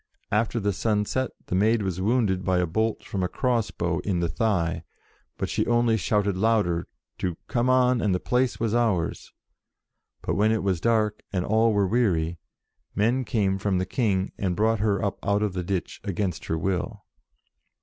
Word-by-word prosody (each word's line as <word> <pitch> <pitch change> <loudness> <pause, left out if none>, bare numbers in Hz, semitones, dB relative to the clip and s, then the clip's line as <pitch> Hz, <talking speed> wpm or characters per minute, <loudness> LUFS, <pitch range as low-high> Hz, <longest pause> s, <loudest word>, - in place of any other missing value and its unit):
After 110 +2 +1
the 100 -1 0
sun 105 +1 0
set, 130 +4 -1 0.2
the - - -5
Maid 105 +4 +3
was 95 -1 -2
wounded 100 -3 +1
by 95 -1 +1
a 90 - +2
bolt 110 +7 -1
from 95 - -4
a 90 - +1
cross 120 +3 0
bow 85 -1 -2
in 95 -3 -1
the 85 - +1
thigh, 85 -1 0 0.5
but - - -2
she - - 0
only 120 -1 +3
shouted 105 -1 +1
louder 100 -5 +1 0.3
to 90 -3 -2
'come 125 -1 +1
on 125 -1 +3
and 105 - +1
the - - -1
place 125 +4 0
was 115 -1 0
ours.' 110 -9 0 0.9
But - - -1
when 105 +2 +3
it 110 -2 0
was 95 -4 0
dark 110 -2 +1
and 90 -3 -1
all 110 +2 +3
were 100 -2 +2
weary, 90 -7 +1 0.6
men 120 +5 +2
came 95 -4 0
from 100 -1 0
the 90 - 0
King 100 -3 0
and 95 -3 0
brought 110 +3 +2
her 105 -1 +1
up 100 - -4
out 100 +1 +1
of 105 -3 -1
the 90 - -2
ditch 95 0 -3
against 95 -3 -2
her 80 - -1
will." 90 +2 -2
100 Hz, 190 wpm, -25 LUFS, 95-115 Hz, 0.9 s, Maid